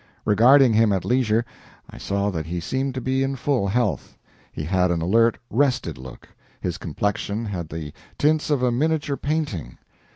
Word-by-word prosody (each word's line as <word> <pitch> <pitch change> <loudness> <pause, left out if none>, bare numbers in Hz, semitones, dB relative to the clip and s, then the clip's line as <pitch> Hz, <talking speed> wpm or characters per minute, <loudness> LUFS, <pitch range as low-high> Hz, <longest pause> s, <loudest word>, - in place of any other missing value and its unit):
Regarding 120 +4 +6
him 110 -1 +4
at 95 -2 -1
leisure, 120 -2 +1 0.4
I - - -12
saw 100 +1 -1
that 80 -3 -4
he 90 +1 -3
seemed 130 +9 -2
to 130 - -3
be 130 +1 0
in 135 0 -1
full 130 -5 0
health. 120 +5 -1 0.3
He - - -5
had 90 +3 +1
an 85 -1 0
alert, 115 +7 +3
rested 130 - 0
look; 65 -1 -11 0.3
his 90 +1 -4
complexion 105 +6 -2
had 90 -6 -5
the 75 -2 -6 0.2
tints 155 +1 +2
of 140 -4 +1
a 125 - +3
miniature 145 +2 0
painting. 140 - -3
115 Hz, 170 wpm, -23 LUFS, 90-135 Hz, 0.4 s, Regarding